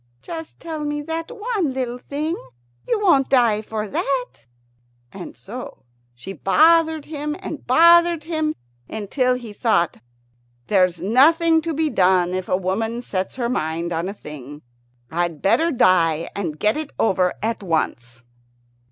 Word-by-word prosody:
"Just 325 -1 -8
tell 320 -2 -6
me 295 0 -3
that 325 +1 -4
one 425 - -2
little 250 -2 -3
thing. 300 +6 -3 0.5
You 445 - +1
won't 285 -10 +3
die 235 -5 +3
for 215 0 -4
that." 255 +5 -1 0.8
And 190 -2 -9
so 245 - -9 0.3
she 185 +11 -8
bothered 320 - +3
him 300 -1 -4
and 320 -5 -7
bothered 335 +3 +5
him, 315 -1 -1 0.3
until 250 +4 0
he 235 -4 -8
thought, 205 -7 +1 0.7
"There's 185 -4 +2
nothing 320 - +4
to 325 +1 -3
be 315 0 0
done 180 -1 +3
if 185 0 -3
a 185 - +2
woman 220 +6 -2
sets 190 -4 -3
her 245 -2 -1
mind 170 -6 -2
on 165 +3 -2
a - - -5
thing. 145 -3 -10 0.5
I'd 170 -1 -1
better 320 - +2
die 170 - +2
and 170 -7 -3
get 210 - +1
it 310 -2 -4
over 185 -4 +1
at 225 0 -1
once." 125 -9 -2
240 Hz, 145 wpm, -21 LUFS, -, 0.8 s, bothered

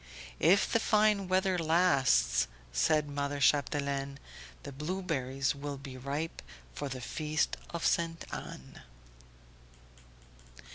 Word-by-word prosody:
"If 195 +3 +5
the 230 - +4
fine 210 -3 +3
weather 185 0 +2
lasts," 135 - +3 0.3
said 155 -2 +2
mother 145 0 -3
Chapdelaine, 140 -1 +1 0.5
"the - - -7
blueberries 140 -4 -2
will 145 0 -5
be 135 -1 -9
ripe 140 +5 -4 0.3
for 140 - -4
the 130 -1 -5
feast 150 +3 -1
of 170 -1 -4
Ste. 165 -1 0
Anne." 65 0 -8
145 Hz, 105 wpm, -31 LUFS, 135-170 Hz, 0.5 s, If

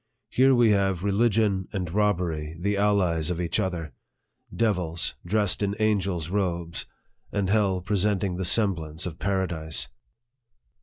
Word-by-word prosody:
Here 130 +1 +4
we 120 -3 +5
have 95 -3 +1
religion 100 -2 +2
and 90 -4 -4
robbery 85 -7 0
the 100 +3 0
allies 95 -6 +2
of 90 -1 -2
each 85 -2 -1
other 85 -5 -3 0.6
devils 90 -7 0
dressed 105 +1 +1
in 100 0 0
angels' 95 -6 0
robes, 85 -4 -2 0.4
and 100 -2 -1
hell 100 -3 +2
presenting 100 -1 0
the 95 - -2
semblance 85 -6 +2
of 85 -2 -6
paradise. 85 -8 -1
95 Hz, 125 wpm, -26 LUFS, 85-105 Hz, 0.6 s, we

